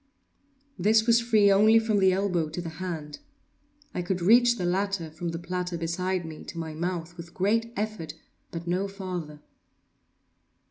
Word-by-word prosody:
This 220 +4 +4
was 235 0 +5
free 215 -4 +4
only 215 +3 +6
from 220 -2 +2
the 190 -1 +5
elbow 185 -4 0
to 165 - -6
the 170 -1 -4
hand. 160 -5 -5 0.7
I - - -2
could 180 +1 -2
reach 235 +6 +5
the 180 - -2
latter, 185 -2 -1
from 170 +2 -4
the 165 - -4
platter 180 0 -3
beside 175 +2 -2
me, 160 -1 -8
to - - -8
my 160 -1 -4
mouth, 170 +1 -4
with 170 0 -10
great 225 +4 +1
effort, 205 -7 -4 0.3
but 165 0 -6
no 180 +3 0
farther. 180 -6 -6
180 Hz, 165 wpm, -27 LUFS, 170-205 Hz, 0.7 s, only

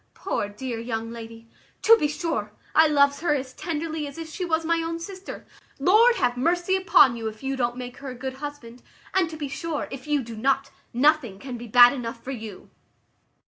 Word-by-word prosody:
Poor 205 - -2
dear 230 +3 -5
young 230 -1 -4
lady! 230 0 -10 0.4
To 455 - +8
be 300 - +1
sure, 295 - -3 0.2
I 320 0 +6
loves 280 -1 +3
her 320 -3 +1
as 260 -2 -4
tenderly 315 -1 -3
as 280 - -10
if 330 -1 -6
she 320 +4 -5
was 325 -2 0
my 335 0 +1
own 330 0 -3
sister. 375 +2 -8 0.3
Lord 430 - +5
have 245 - +1
mercy 350 +7 +1
upon 360 -9 +5
you, 225 -1 -4
if 220 +3 -8
you 270 0 -1
don't 240 -1 -1
make 250 -1 -7
her 275 - -7
a 255 - -7
good 260 +1 -6
husband! 275 -4 -8 0.3
and 375 -3 +2
to 315 - -8
be 295 -2 -4
sure, 300 +2 -4
if 270 +1 -8
you 295 -2 +1
do 230 -1 -8
not, 270 +4 0 0.2
nothing 260 -5 +2
can 255 +4 -7
be 240 0 -8
bad 245 +3 +8
enough 230 -3 -6
for 270 - -5
you." 220 -6 -8
275 Hz, 210 wpm, -25 LUFS, 240-320 Hz, 0.4 s, To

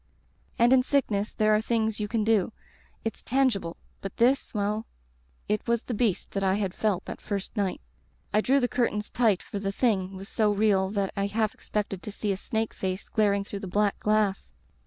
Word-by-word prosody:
And 240 +2 +5
in 260 - +6
sickness 230 -7 0
there 215 0 +3
are 215 - +3
things 220 -1 0
you 210 - -1
can 220 0 0
do; 215 -1 +2 0.5
it's 225 - -3
tangible 235 -10 +1
— - - -37
^but 195 - -3
this 255 +4 +3
— - - -19
^well, 210 +2 0 0.6
it 210 +2 -1
was 235 0 +1
the 245 - -4
Beast 210 -5 0
that 195 - -2
I 190 0 +3
had 195 -3 -1
felt 200 -4 0
that - - -7
first 200 0 -4
night. 200 -4 -1 0.5
I 215 - +4
drew 270 +5 +3
the 245 - +2
curtains 230 -4 -1
tight 220 -6 +2
for 200 - -5
the 195 0 -1
Thing 195 -4 +1
was 195 +1 -8
so 215 -2 +2
real 200 -2 +3
that 200 -1 -1
I 200 0 0
half 215 +1 0
expected 200 -3 -3
to 210 - -6
see 205 0 -2
a 190 - -1
snake 220 +2 -2
face 190 +1 -4
glaring 200 -2 +2
through 200 0 -6
the 195 - -6
black 205 +2 +1
glass. 210 -2 +1
210 Hz, 210 wpm, -27 LUFS, 195-225 Hz, 0.6 s, in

